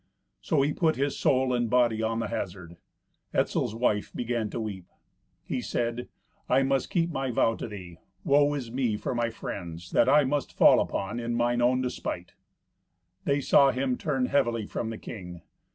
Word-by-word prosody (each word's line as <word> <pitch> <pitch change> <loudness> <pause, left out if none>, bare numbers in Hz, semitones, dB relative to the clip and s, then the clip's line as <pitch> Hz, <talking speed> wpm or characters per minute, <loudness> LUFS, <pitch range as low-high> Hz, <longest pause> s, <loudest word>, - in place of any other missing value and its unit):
So 135 - +2
he 145 +1 +1
put 160 -2 +2
his 140 +1 -1
soul 130 -1 +2
and 120 -2 0
body 120 -2 +3
on 115 0 0
the 115 - -2
hazard. 90 -2 -5 0.6
Etzel's 110 - 0
wife 110 -3 0
began 120 -2 -2
to 120 - -4
weep. 100 -5 -5 0.6
He - - -3
said, 120 +1 -2 0.4
"I 130 +2 +4
must 135 0 0
keep 170 -1 0
my 135 -4 -2
vow 115 -1 +2
to - - -5
thee. 90 -6 -9 0.2
Woe 145 +1 +4
is 125 -5 -5
me 120 -4 0
for - - -3
my 120 -1 0
friends, 90 -6 -7
that 120 - +4
I 150 +2 +6
must 140 +1 -2
fall - - +7
upon 105 +5 -2
in 120 0 -2
mine 120 0 +1
own 125 +1 +3
despite!" 90 -7 -4 0.9
They 140 0 +1
saw 140 0 +5
him 130 -1 0
turn 135 -2 -1
heavily 120 -5 +1
from 110 - -4
the 115 - -5
king. 90 -8 -9
120 Hz, 180 wpm, -27 LUFS, 110-135 Hz, 0.9 s, fall